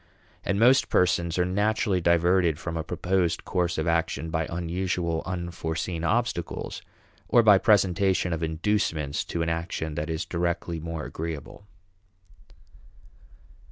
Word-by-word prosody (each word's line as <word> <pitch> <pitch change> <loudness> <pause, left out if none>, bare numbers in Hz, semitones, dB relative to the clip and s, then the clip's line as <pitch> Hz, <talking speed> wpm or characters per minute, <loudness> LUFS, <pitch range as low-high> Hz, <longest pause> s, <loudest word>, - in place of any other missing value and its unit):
And 100 - 0
most 125 +4 +5
persons 85 -1 +2
are 90 - +2
naturally 100 0 +1
diverted 85 -1 +3
from 85 0 -5
a 80 - -2
proposed 90 +1 -1
course 90 -2 -1
of 80 - -1
action 80 -1 0
by 80 -1 -1
unusual, 85 -1 -2
unforeseen 85 -2 -3
obstacles, 110 -3 -2 0.5
or 120 - +5
by 105 -3 +7
presentation 95 -3 +2
of 80 - -3
inducements 80 -3 -1
to 85 - -2
an 80 - -1
action 80 -1 -3
that 75 +2 -3
is 80 +1 -2
directly 85 -1 -2
more 80 -1 -5
agreeable. 80 +4 -7
85 Hz, 125 wpm, -26 LUFS, 80-95 Hz, 0.5 s, by